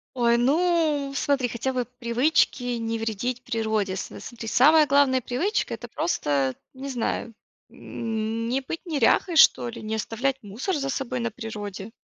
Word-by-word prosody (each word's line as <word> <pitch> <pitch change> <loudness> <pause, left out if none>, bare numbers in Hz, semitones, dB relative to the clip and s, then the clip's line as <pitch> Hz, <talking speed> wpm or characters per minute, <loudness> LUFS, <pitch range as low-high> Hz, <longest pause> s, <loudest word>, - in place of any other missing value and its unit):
Ой, 235 -1 +3
ну 300 +1 +2
смотри. 275 -3 +1
Хотя 245 +3 -3
бы 250 -1 -1
привычки 250 +3 +2
не 230 0 -2
вредить 230 +3 -3
природе. 220 -5 -1
С 190 - -5
с - - -10
смотри, 230 -1 -8
самая 300 +6 +5
главная 275 -2 +4
привычка- 310 - -1
это - - -7
просто, 140 - 0 0.2
не 270 +1 -7
знаю, 240 -2 -2 0.4
не 230 +3 -3
быть 330 +7 -6
неряхой 330 +2 +2
что 125 - +6
ли, - - -8
не 215 0 -3
оставлять 240 +5 -1
мусор 225 - -3
за 275 -2 -2
собой 260 -2 -2
на 235 -1 -2
природе. 210 -2 -7
245 Hz, 155 wpm, -25 LUFS, 225-275 Hz, 0.4 s, что